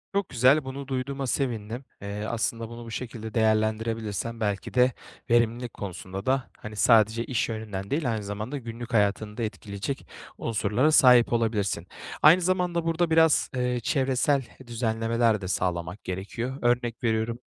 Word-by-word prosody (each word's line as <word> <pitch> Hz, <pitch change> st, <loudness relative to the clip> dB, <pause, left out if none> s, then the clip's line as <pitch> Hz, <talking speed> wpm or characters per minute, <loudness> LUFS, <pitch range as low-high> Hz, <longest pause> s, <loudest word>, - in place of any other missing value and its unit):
Çok 200 Hz, -2 st, 0 dB
güzel, 130 Hz, +5 st, +4 dB
bunu 135 Hz, +1 st, -6 dB
duyduğuma 135 Hz, +1 st, -3 dB
sevindim. 120 Hz, -1 st, -2 dB, 0.2 s
Eee, 100 Hz, +1 st, -4 dB
aslında 115 Hz, 0 st, -2 dB
bunu 120 Hz, 0 st, -9 dB
bu 115 Hz, -, -9 dB
şekilde 110 Hz, -2 st, -6 dB
değerlendirebilirsen 110 Hz, 0 st, 0 dB
belki 105 Hz, -3 st, -2 dB
de 125 Hz, +1 st, +4 dB, 0.4 s
verimlilik 120 Hz, 0 st, +2 dB
konusunda 95 Hz, 0 st, -6 dB
da, 130 Hz, -1 st, 0 dB
hani, 110 Hz, 0 st, -9 dB
sadece 110 Hz, +1 st, +4 dB
iş 120 Hz, -2 st, -1 dB
yönünden 105 Hz, -3 st, -5 dB
değil, 140 Hz, -4 st, 0 dB
aynı 110 Hz, -2 st, -2 dB
zamanda 105 Hz, +7 st, -4 dB
günlük 120 Hz, -1 st, -7 dB
hayatını 105 Hz, 0 st, +1 dB
da 115 Hz, -, -2 dB
etkileyecek 105 Hz, +4 st, -5 dB, 0.3 s
unsurlara 115 Hz, +6 st, +1 dB
sahip 125 Hz, -5 st, +6 dB
olabilirsin. 105 Hz, -6 st, 0 dB, 0.3 s
Aynı 165 Hz, +5 st, +7 dB
zamanda 180 Hz, -2 st, 0 dB
burada 165 Hz, 0 st, +1 dB
biraz, 160 Hz, -1 st, +4 dB
eee, 125 Hz, -1 st, 0 dB
çevresel 135 Hz, 0 st, +1 dB, 0.2 s
düzenlemeler 115 Hz, -1 st, +1 dB
de 95 Hz, -, -4 dB
sağlamak 90 Hz, +1 st, -2 dB
gerekiyor. 110 Hz, +8 st, -4 dB
Örnek 120 Hz, -1 st, 0 dB
veriyorum: 115 Hz, 0 st, 0 dB
115 Hz, 145 wpm, -26 LUFS, 110-130 Hz, 0.4 s, Aynı